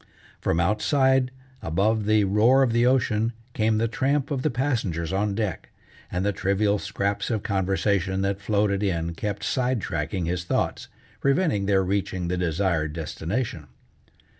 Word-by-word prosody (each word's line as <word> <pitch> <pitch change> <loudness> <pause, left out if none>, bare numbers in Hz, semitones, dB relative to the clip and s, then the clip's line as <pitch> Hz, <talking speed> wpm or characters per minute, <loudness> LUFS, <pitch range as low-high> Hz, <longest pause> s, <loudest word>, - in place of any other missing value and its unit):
From 80 - 0
outside 130 - +2 0.3
above 105 +6 +1
the 110 -1 +4
roar 110 +7 +4
of 120 -3 +1
the 120 +1 +3
ocean, 115 -3 +2 0.2
came 110 -1 +1
the 115 +1 +1
tramp 135 +5 0
of 135 -3 -1
the 155 - +1
passengers 110 - -1
on 100 +1 0
deck, 105 -3 -3 0.4
and 90 +2 -1
the 105 - +2
trivial 100 +2 +1
scraps 100 +1 -2
of 110 -4 -1
conversation 95 -1 0
that 100 0 -1
floated 100 -1 +1
in 85 -4 -1
kept 100 +4 -4
side 130 -2 0
tracking 85 +1 -3
his 85 +1 -2
thoughts, 85 - -1 0.3
preventing 140 - +1
their 95 -2 +3
reaching 95 -2 -1
the 90 - -1
desired 85 -3 0
destination. 80 - -3
100 Hz, 150 wpm, -25 LUFS, 95-115 Hz, 0.4 s, the